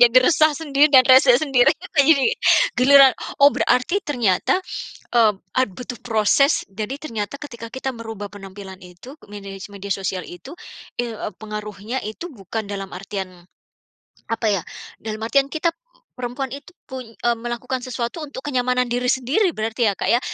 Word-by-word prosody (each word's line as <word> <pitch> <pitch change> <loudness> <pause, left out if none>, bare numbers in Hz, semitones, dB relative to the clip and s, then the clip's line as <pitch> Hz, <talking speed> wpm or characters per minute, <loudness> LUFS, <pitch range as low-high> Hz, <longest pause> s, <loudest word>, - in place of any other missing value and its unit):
jadi 245 +1 +7
resah 310 -1 +4
sendiri 295 -2 +3
dan 260 -3 +7
rese 260 -1 +7
sendiri 270 -3 +3 0.3
jadi 285 - +4 0.4
giliran 270 +1 +7 0.3
oh, 285 - +7
berarti 345 +11 +1
ternyata, 240 - +1 0.6
eee, 220 +1 +2
butuh 245 +4 -8
proses 235 +6 +2
jadi 215 +7 -4
ternyata 230 -5 -5
ketika 235 -6 -9
kita 260 +2 -4
merubah 225 -3 -8
penampilan 195 -1 -10
itu 180 +8 -13 0.2
medi 200 -1 -9 0.2
media 200 0 -4
sosial 190 -2 -3
itu 265 - -11 0.4
i 240 -1 -2 0.2
pengaruhnya 210 +3 -6
itu 320 +10 -8
bukan 220 0 -5
dalam 200 -1 -6
artian, 190 -2 -7 0.8
apa 230 0 -2
ya, - - -12 0.4
dalam 215 0 -6
artian 275 +4 +2
kita 330 +2 -1
p - - -45 0.4
perempuan 250 +2 -4
itu, 285 +6 -9 0.2
pun 260 -1 -6
eee, 235 +1 -2
melakukan 240 +2 -4
sesuatu 250 +4 -4
untuk 275 -3 -8
kenyamanan 250 -3 0
diri 250 +1 -1
sendiri 270 - +1
berarti 225 +1 0
ya, - - +2
Kak, - - -3
ya. 240 - +3
245 Hz, 150 wpm, -21 LUFS, 210-270 Hz, 0.8 s, jadi